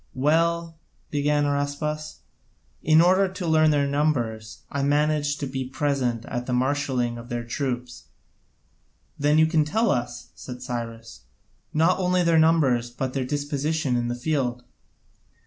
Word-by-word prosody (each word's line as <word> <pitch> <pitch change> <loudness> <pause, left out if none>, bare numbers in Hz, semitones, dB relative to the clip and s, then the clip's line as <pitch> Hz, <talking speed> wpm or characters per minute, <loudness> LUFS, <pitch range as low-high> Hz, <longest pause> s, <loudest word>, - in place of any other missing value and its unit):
"Well," 165 +4 +1 0.3
began 145 0 +1
Araspas, 145 - -3 0.6
"in 155 +1 +5
order 185 +3 +4
to 185 -1 -6
learn 155 -1 +4
their 145 -2 +2
numbers, 130 -7 -1
I 140 - -2
managed 145 +1 +1
to - - -1
be 130 0 -3
present 130 -3 -1
at 120 0 -4
the 125 - -1
marshalling 125 -2 0
of 120 +1 -11
their 120 0 -3
troops." 125 0 -4 1.1
"Then 145 +1 +3
you 160 - +6
can 160 -1 +2
tell 220 +10 +1
us," 120 -2 -3
said 125 -1 -9
Cyrus, 115 - -6 0.5
"not 165 +5 +2
only 180 -1 +2
their 165 -1 +4
numbers 140 -7 +3
but 130 +2 -4
their 135 -2 -1
disposition 145 0 -1
in 120 0 0
the 120 - -2
field." 125 -2 -2
145 Hz, 145 wpm, -24 LUFS, 125-155 Hz, 1.1 s, you